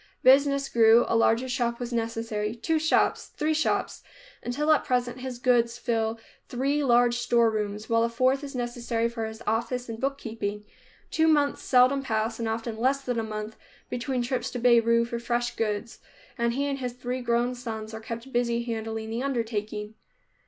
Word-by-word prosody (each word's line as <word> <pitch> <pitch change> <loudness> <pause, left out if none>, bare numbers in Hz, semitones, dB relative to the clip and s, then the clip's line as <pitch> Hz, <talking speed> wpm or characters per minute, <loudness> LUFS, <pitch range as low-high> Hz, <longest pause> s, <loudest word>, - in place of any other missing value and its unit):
Business 275 +1 +5
grew, 230 0 +5
a - - +1
larger 230 +2 +3
shop 240 -2 -1
was 245 0 -4
necessary, 225 -2 -2
two 315 +7 0
shops, 315 +1 +2
three 310 +1 +1
shops, 315 - 0 0.4
until 295 +6 0
at 310 - +4
present 245 0 -1
his 255 -1 -5
goods 240 -2 +2
fill 230 -2 -1 0.3
three 275 +4 0
large 240 -2 +4
storerooms, 220 -3 +1
while 230 0 +2
a 235 - +1
fourth 255 +4 +1
is 275 -2 -7
necessary 240 -1 -1
for 230 -1 -4
his 220 +1 -9
office 235 +3 -1
and 225 -1 -5
bookkeeping. 225 -6 -3 0.5
Two 320 0 +3
months 290 -2 +2
seldom 255 +2 +4
pass, 225 -3 -2
and 230 -1 -1
often 225 0 -3
less 270 +3 +2
than 245 -3 -2
a - - -1
month, 215 0 -6 0.3
between 250 0 -1
trips 255 +1 -2
to - - -5
Beirut 235 -1 +4
for 235 0 -4
fresh 240 0 -1
goods, 220 +1 -3 0.4
and 235 -1 0
he 280 +3 -1
and 280 -1 -2
his 250 -2 -3
three 250 +1 -4
grown 240 +1 +1
sons 220 -3 -6
are 220 - -6
kept 230 +4 -7
busy 235 -1 +1
handling 225 -1 -4
the 230 +2 -2
undertaking. 220 -5 -3
235 Hz, 175 wpm, -27 LUFS, 225-255 Hz, 0.5 s, Business